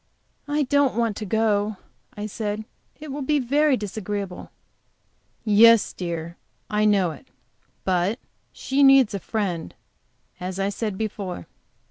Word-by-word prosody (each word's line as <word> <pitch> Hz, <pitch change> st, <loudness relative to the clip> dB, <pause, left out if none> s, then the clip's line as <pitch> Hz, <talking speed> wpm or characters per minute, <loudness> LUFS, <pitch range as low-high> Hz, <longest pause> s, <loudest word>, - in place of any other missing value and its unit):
"I 295 Hz, +1 st, +1 dB
don't 280 Hz, -2 st, +2 dB
want 230 Hz, -3 st, 0 dB
to 215 Hz, -, -5 dB
go," 210 Hz, -1 st, +1 dB, 0.4 s
I 210 Hz, -, -4 dB
said. 215 Hz, 0 st, -4 dB, 0.3 s
"It 305 Hz, -2 st, -8 dB
will 285 Hz, +2 st, -4 dB
be 295 Hz, +2 st, +1 dB
very 285 Hz, +2 st, +2 dB
disagreeable." 205 Hz, -2 st, -5 dB, 0.9 s
"Yes, 225 Hz, +1 st, +6 dB
dear, 170 Hz, -1 st, -5 dB, 0.3 s
I 210 Hz, 0 st, +2 dB
know 195 Hz, -5 st, +3 dB
it. 150 Hz, -, -13 dB, 0.6 s
But 185 Hz, +4 st, +1 dB, 0.3 s
she 270 Hz, +1 st, -1 dB
needs 270 Hz, -5 st, +6 dB
a 200 Hz, -, -2 dB
friend, 185 Hz, -5 st, -3 dB, 0.6 s
as 185 Hz, +1 st, -5 dB
I 195 Hz, +1 st, +1 dB
said 205 Hz, -1 st, -3 dB
before." 200 Hz, -, -4 dB
210 Hz, 130 wpm, -24 LUFS, 195-240 Hz, 0.9 s, Yes